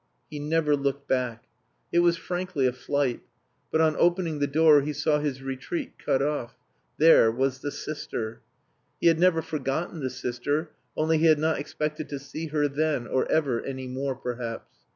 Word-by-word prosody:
He 150 - -5
never 150 0 +2
looked 140 0 -2
back. 125 -3 -1 0.5
It 170 - +3
was 170 -1 +4
frankly 175 -4 -2
a 125 - +2
flight. 135 0 -1 0.5
But 160 - +3
on 155 -1 +3
opening 170 -3 +2
the 145 - +1
door 150 0 +5
he 150 +2 -3
saw 150 0 +1
his 140 -3 -3
retreat 135 +5 -5
cut 135 0 +2
off: 145 -5 -2 0.4
There 155 -8 +6
was 130 +2 -1
the 145 - -3
sister. 120 -7 -5 0.6
He - - -4
had 165 -1 +5
never 170 -2 +4
forgotten 155 +3 -3
the 130 -3 -2
sister, 145 +6 -2 0.3
only 160 0 +2
he 165 - +4
had 155 -1 +6
not 160 +1 +1
expected 150 +1 -4
to 145 - -4
see 145 +4 -6
her 150 -1 +1
then 145 -2 0
or 130 - 0
ever 135 -7 +1
any 130 -1 -5
more, 130 +1 -3
perhaps. 120 -2 -6
145 Hz, 175 wpm, -26 LUFS, 130-160 Hz, 0.6 s, There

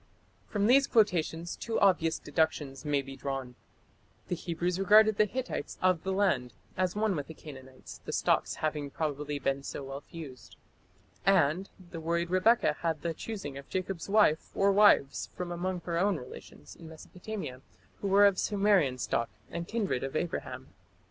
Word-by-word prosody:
" - - -36
From 205 -1 +1
these 270 +4 +5
quotations 175 -6 +1
two 225 -1 -2
obvious 170 -5 +3
deductions 145 -3 -1
may 145 -2 0
be 135 0 -9
drawn: 135 -2 -4 0.8
the 180 - 0
Hebrews 175 +2 -2
regarded 215 +2 +6
the 215 - +5
Hittites 255 - -4
"of 185 -3 +2
the 190 - -3
land" 185 - +1 0.2
as 185 0 0
one 210 -2 +1
with 145 -3 -4
the 160 - -10
Canaanites, 130 -4 -11
the - - -6
stocks - - +1
having 150 -2 -2
probably 145 -1 -3
been 135 0 -1
so 140 - -6
well 135 +1 -6
fused, 150 -6 -11 0.7
and 185 -1 +3 0.2
the 165 - -6
worried 170 +1 -1
Rebekah 185 -4 +3
had 165 -3 -2
the 170 -1 -1
choosing 160 -8 -6
of 140 - -13
Jacob's 185 -1 -3
wife 200 -7 +3
or 200 0 +4
wives 200 -9 +4
from 180 -1 -4
among 180 +1 -3
her 170 -1 -2
own 195 -1 +2
relations 125 -3 -11
in 165 -2 -12
Mesopotamia 175 -3 -7 0.4
who 200 - -3
were 200 +1 +6
of 200 -2 +4
Sumerian 195 -10 +2
stock 115 -2 -1 0.2
and 170 0 -4
kindred 205 - -1
of 135 +2 -4
Abraham. 170 +2 -3
170 Hz, 170 wpm, -30 LUFS, 145-195 Hz, 0.8 s, regarded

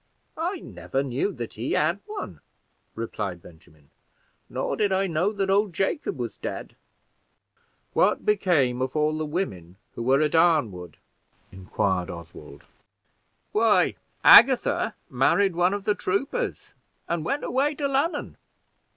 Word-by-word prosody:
"I 350 +2 -2
never 135 +1 -4
knew 135 +9 -1
that 120 -6 -7
he 115 +4 -3
had 165 +6 +1
one," 420 -1 -7 0.5
replied 105 -5 -4
Benjamin; 80 -3 -19 0.6
"nor - - -2
did 205 -2 +1
I 190 +1 +2
know 175 +3 0
that 195 -2 -1
old 200 -1 +2
Jacob 290 - -2
was - - -5
dead." - - -6 1.2
"What - - +2
became 155 - +2
of 130 +2 -2
all 155 0 +1
the 155 0 -3
women 95 - -4 0.2
who - - -7
were 130 +3 +3
at 150 -1 +1
Arnwood?" 120 - +2 0.5
inquired 95 -1 -2
Oswald. 80 -4 -11 0.9
"Why, - - +3 0.3
Agatha - - +6
married 175 +9 +2
one 175 +2 +3
of 205 - -5
the 210 - +2
troopers, 270 - -3 0.3
and 170 -2 -2
went 280 - -2
away 280 +4 0
to 285 -1 -1
London." 280 +5 -1
160 Hz, 135 wpm, -25 LUFS, -, 1.2 s, Agatha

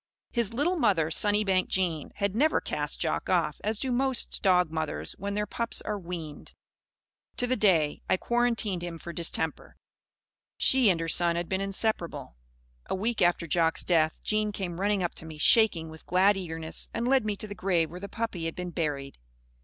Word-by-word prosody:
His 235 -4 0
little 295 +10 0
mother, 185 - +2
Sunnybank 205 0 +2
Jean, 170 -5 -1
had 200 -1 -1
never 305 +7 +3
cast - - -3
Jock - - -2
off, - - +1
as 215 +1 -1
do 260 +3 -2
most 260 0 0
dog 180 -4 +3
mothers 155 - -3
when 200 +1 -3
their 210 0 0
pups 235 +2 -2
are 210 -1 -3
weaned. 170 -4 -8 0.8
To 245 - +1
the 255 +1 +1
day 165 -10 +2
I - - +3
quarantined 230 -5 0
him 175 -1 -5
for 170 +1 -8
distemper, 160 -2 -2 0.8
she 260 -5 +5
and 175 -3 +2
her 165 - -2
son 170 +1 +2
had 170 0 -2
been 190 0 -1
inseparable. 190 - -1 0.5
A - - -1
week 220 +4 -1
after 175 -1 +3
Jock's 165 0 +1
death, 160 -3 +1
Jean 215 0 0
came 185 -3 -4
running 200 -1 +1
up 175 - -2
to - - -9
me, 155 -1 -9
shaking 175 -1 +4
with 160 0 -13
glad 190 +3 +4
eagerness, 165 -4 -3
and 235 +1 -1
led 265 -1 +4
me 210 -1 -1
to 205 - -6
the 205 - -7
grave 175 -5 0
where 180 - -8
the 200 +1 -7
puppy 225 -8 -3
had 165 - -3
been 180 -1 -5
buried. 145 - -3
185 Hz, 190 wpm, -28 LUFS, 165-215 Hz, 0.8 s, she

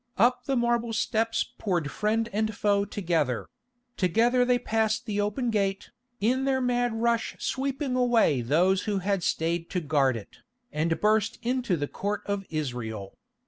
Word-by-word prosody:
Up 245 +3 +3
the 270 - 0
marble 235 -1 +1
steps 225 +1 +1 0.2
poured 175 -8 -1
friend 220 +1 0
and 215 +1 0
foe 200 -1 +2
together; 165 - -1 0.5
together 230 +7 +3
they 245 0 +3
passed 225 -1 0
the 205 -2 -1
open 220 +4 -1
gate, 195 -2 -1 0.3
in 255 +6 +1
their 265 -1 +2
mad 245 -1 +1
rush 235 -1 0
sweeping 270 0 -2
away 240 - +3
those 175 +10 +2
who 210 -2 0
had 195 0 0
stayed 165 0 -1
to 185 - -1
guard 140 -6 +2
it, 105 - -11 0.3
and 160 +2 0
burst 215 0 +2
into 245 -6 0
the 145 -1 -2
Court 205 +5 -3
of 200 -1 -2
Israel. 120 -10 -4
210 Hz, 155 wpm, -27 LUFS, 170-240 Hz, 0.5 s, Up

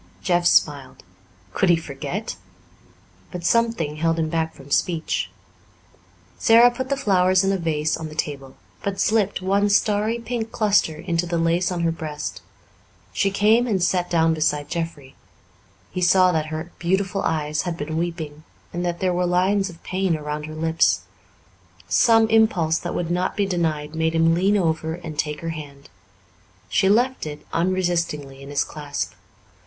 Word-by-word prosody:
Jeff 175 -2 +2
smiled. 145 -5 +1 0.5
Could 190 - +2
he 175 - +6
forget? 160 +6 -5 0.9
But 180 -2 -7
something 225 -9 +1
held 165 +1 +1
him 160 -1 0
back 160 0 -1
from 140 +1 -14
speech. 165 0 0 1.1
Sara 235 +2 +6
put 260 +2 -5
the 275 - 0
flowers 185 -4 +3
in 195 - +2
a 195 - +1
vase 155 -2 0
on 160 -1 -6
the 155 - -11
table, 140 -3 -4 0.3
but 200 -1 -3
slipped 210 -3 +1
one 200 +2 +2
starry 210 +2 +2
pink 230 -1 -4
cluster 205 -7 +2
into 170 +2 -2
the 170 0 -1
lace 170 +2 +1
on 175 -1 -2
her 165 -1 +2
breast. 155 -2 -5 0.7
She 200 - +1
came 215 +5 +3
and 195 -6 0
sat 180 -1 +1
down 165 -1 +3
beside 150 -2 0
Jeffrey; 165 -6 -5 0.8
he 180 - -3
saw 185 +1 +5
that 155 -2 -1
her 160 +2 -5
beautiful 190 +2 0
eyes 155 -1 -1
had 175 -2 -4
been 155 +1 -4
weeping, 160 -3 -4 0.3
and 175 0 -2
that 175 -1 -2
there 185 -1 +1
were 180 0 0
lines 190 +3 +2
of 170 -1 -14
pain 185 -3 0
around 150 0 -5
her 155 - -8
lips. 160 - +2 0.9
Some 225 - +4
impulse 185 -8 +3
that 175 - -5
would 175 -1 -2
not 180 +1 -1
be 200 - +2
denied 160 -5 -1
made 160 0 0
him 165 0 +4
lean 195 +5 +2
over 160 -3 0
and 160 -4 -8
take 150 -1 -2
her 165 - -4
hand. 145 -4 -9 0.8
She 190 - +2
left 245 -2 +2
it 150 0 -8
unresistingly 170 -6 -1
in 140 - -10
his 145 - +1
clasp. 145 -2 -5
170 Hz, 165 wpm, -23 LUFS, 155-190 Hz, 1.1 s, he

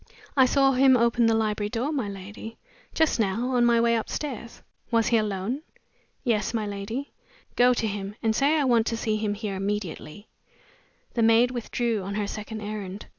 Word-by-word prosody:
"I 265 -2 +6
saw 270 +1 +4
him 260 0 +5
open 235 0 +3
the 225 - +3
library 210 -1 0
door, 250 +6 -2
my 260 -9 -2
lady, 205 +3 -9 0.4
just 320 -6 +2
now, 225 +5 0
on 245 -1 +3
my 235 -1 +4
way 235 0 +3
upstairs." 235 +1 -5 0.3
"Was 230 -2 +2
he 235 - +4
alone?" 215 +5 -2 0.6
"Yes, 230 -2 0
my 220 -2 -1
lady." 205 +7 -5 0.4
"Go 245 0 +5
to 230 - -1
him, 200 -1 -4
and 220 -1 +2
say 290 +6 +3
I 295 - +2
want 235 -4 +3
to 230 - -1
see 220 -2 -1
him 210 -1 -1
here 210 -2 -4
immediately." 200 -1 -4 0.9
The 235 - 0
maid 230 +2 +5
withdrew 235 -2 -2
on 200 +2 -5
her 210 -1 -1
second 215 +1 -6
errand. 205 -2 -6
225 Hz, 180 wpm, -26 LUFS, 210-245 Hz, 0.9 s, I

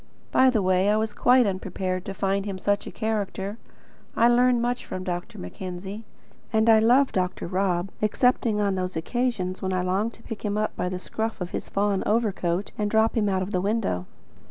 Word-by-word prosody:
By 260 - +5
the 220 -6 +1
way, 185 +1 +3
I 210 - +3
was 220 0 -1
quite 250 0 +4
unprepared 185 -1 -3
to 195 - -5
find 195 +1 0
him 195 -2 -3
such 205 +2 0
a - - -6
character. 210 -1 -3 0.6
I 235 - +5
learn 245 0 +4
much 245 +1 -1
from 185 - -6
Dr. 175 -1 -4
Mackenzie, 185 - -7 0.5
and 220 0 +4
I 220 - +7
love 250 +5 +4
Dr. 180 -1 -1
Rob, 185 0 0
excepting 220 0 +2
on 200 -1 +1
those 185 -1 -3
occasions 190 0 -2
when 190 0 -1
I 180 -1 0
long 190 +5 0
to 230 - -17
pick 225 - -7
him 210 -1 -1
up 215 0 -1
by 180 - -1
the 185 - -3
scruff 220 +4 -4
of 180 -1 -4
his - - -5
fawn 200 -1 +1
overcoat 200 -4 0
and 210 -1 0
drop 220 +1 +2
him 210 -3 +2
out 190 -1 +1
of 190 - -6
the 180 - 0
window. 195 - -1
200 Hz, 205 wpm, -25 LUFS, 185-225 Hz, 0.6 s, I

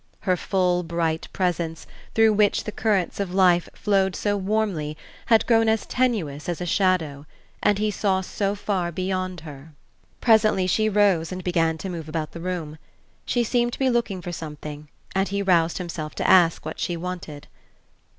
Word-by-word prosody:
Her 185 -2 +2
full 180 -1 +1
bright 165 -1 -2
presence, 170 -3 -2 0.3
through 225 -1 +5
which 210 -1 +2
the 215 - -5
currents 205 -5 0
of 190 -2 -3
life 180 -3 +4
flowed 195 -2 +1
so 205 -1 0
warmly, 190 -7 -1 0.3
had 225 -1 +4
grown 225 -2 +4
as 220 -1 +1
tenuous 185 - -1
as 175 - -2
a 180 - -3
shadow, 165 -6 0 0.3
and 205 -1 +3
he 210 +1 0
saw 195 -2 +1
so 200 +2 -2
far 190 -4 -2
beyond 185 0 -3
her 150 0 -11 0.5
Presently 215 -5 +4
she 215 +4 +2
rose 195 -6 +2
and 185 0 -5
began 165 -3 +1
to 190 - -6
move 165 -4 -6
about 155 -1 -3
the 170 - -8
room. 165 -4 -4 0.5
She 240 - +1
seemed 240 +1 +1
to - - -5
be 265 -1 +2
looking 225 -6 -1
for 175 - -5
something 150 -2 -7 0.2
and 195 +1 +1
he 200 0 -2
roused 170 -3 +3
himself 165 -4 -5
to - - -1
ask 170 -4 +5
what 160 - -6
she 175 - -2
wanted. 170 -4 -6
185 Hz, 175 wpm, -24 LUFS, 165-205 Hz, 0.5 s, through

